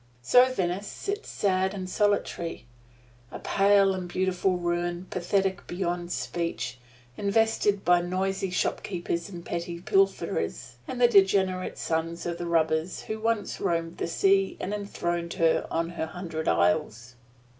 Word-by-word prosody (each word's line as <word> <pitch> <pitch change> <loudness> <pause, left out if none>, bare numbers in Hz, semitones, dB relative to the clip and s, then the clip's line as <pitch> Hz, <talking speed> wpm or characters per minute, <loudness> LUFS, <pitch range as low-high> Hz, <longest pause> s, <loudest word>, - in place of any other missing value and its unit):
So 250 - +6
Venice 190 -3 -2
sits 410 +2 -5
sad 190 0 0
and 185 -2 -5
solitary 200 - -1 0.6
a - - -7
pale 195 0 +4
and 185 -1 -5
beautiful 185 0 0
ruin, 175 0 -2
pathetic 190 +1 0
beyond 175 -1 -3
speech, 165 -9 -3 0.4
infested 205 -1 +1
by 175 0 +5
noisy 190 +2 -1
shop 180 - 0
keepers 170 -2 -3
and 175 -3 -9
petty 170 0 -4
pilferers, 390 - 0
the 245 -1 +3
degenerate 190 -3 +3
sons 165 +1 -2
of 170 0 -3
the 175 - -3
robbers 160 0 +1
who 220 0 -4
once 225 -1 -1
roamed 165 -1 -1
the - - -1
sea 195 +3 +2
and 195 - -3
enthroned 175 -4 -3
her 165 -1 +2
on 165 0 -1
her 170 -2 -4
hundred 165 -2 -5
isles. 105 +8 +1
180 Hz, 135 wpm, -27 LUFS, 170-195 Hz, 0.6 s, So